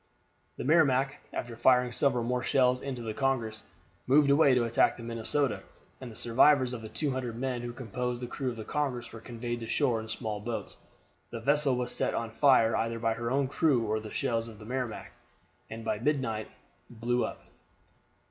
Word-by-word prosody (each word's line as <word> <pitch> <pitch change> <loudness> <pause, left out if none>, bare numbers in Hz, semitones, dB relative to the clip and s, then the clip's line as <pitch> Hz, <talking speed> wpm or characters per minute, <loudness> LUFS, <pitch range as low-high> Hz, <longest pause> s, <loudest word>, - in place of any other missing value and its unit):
The - - -4
Merrimac, 140 -3 +3
after 120 -1 -5
firing 125 +1 +4
several 125 -1 +1
more 125 +1 -1
shells 125 -1 +2
into 130 -3 -5
the 110 -1 -4
Congress, 115 -5 -1 0.4
moved 140 +2 +5
away 140 -2 +5
to 125 - +3
attack 115 0 +2
the 115 - -9
Minnesota, 115 +3 0 0.4
and 130 - -7
the 110 - -11
survivors 130 +3 +4
of 120 - -5
the 110 - -8
200 130 -5 -2
men 125 -1 -2
who 120 0 -5
composed 125 0 -4
the 125 - -4
crew 130 +2 -3
of 120 - -5
the 110 - -6
Congress 135 -5 -3
were 115 - -9
conveyed 120 0 -5
to 115 - -6
shore 125 -5 +1
in 110 0 -8
small 110 -2 -4
boats. 115 +2 -5 0.5
The 115 - -6
vessel 145 +2 +3
was 125 0 -1
set - - 0
on 115 -1 -3
fire 115 -3 +4
either 115 +1 -1
by 115 0 0
her 115 +1 -3
own 135 +1 +1
crew 140 -3 +2
or 110 0 0
the 110 0 -8
shells 115 -4 -1
of 110 -2 -11
the 105 - -12
Merrimac, 125 -2 -4 0.6
and 110 0 -7
by 105 - -1
midnight 120 -5 -1 0.4
blew 120 +1 -1
up. - - -6
120 Hz, 195 wpm, -29 LUFS, 115-130 Hz, 0.6 s, moved